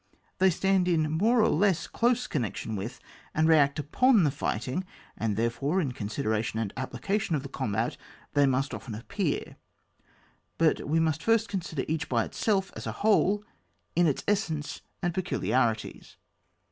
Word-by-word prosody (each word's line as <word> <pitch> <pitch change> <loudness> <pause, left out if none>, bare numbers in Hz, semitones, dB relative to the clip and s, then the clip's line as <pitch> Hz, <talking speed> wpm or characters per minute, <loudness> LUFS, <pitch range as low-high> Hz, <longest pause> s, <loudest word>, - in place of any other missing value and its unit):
They 190 +1 +6
stand 190 +1 +2
in 155 -3 +2
more 220 +9 +3
or 215 - +4
less 190 0 +2
dose 245 +1 +1
connec 120 -9 -2
tion 110 - -4
with 105 +4 -5 0.4
and 155 0 +3
react 145 -4 +4
upon 215 - +3
the 145 - +3
fighting, 130 - -2 0.3
and 105 -2 -1
therefore, 135 +10 0
in 145 -8 0
considering 110 -1 -1
the 110 -2 -2
appli 130 0 -5
cation 200 -4 0
of 140 - -2
the 140 - -7
combat 115 -4 -2 0.4
they 145 -1 +4
must 135 +2 0
often 115 -5 -6
appear; 165 - -3 1.0
but 165 -2 +2
we 160 +3 +2
must 160 -1 +1
first 225 +2 +2
consider 170 -8 -3
each 160 0 -2
by 115 -3 +2
itself, 195 -3 0
as - - -6
a - - -1
whole, 210 -1 +3 0.5
in 175 0 +4
its 145 - 0
essence 175 -8 -1 0.2
and 175 -1 0
peculiarities. 130 - -1
155 Hz, 160 wpm, -28 LUFS, 130-190 Hz, 1.0 s, They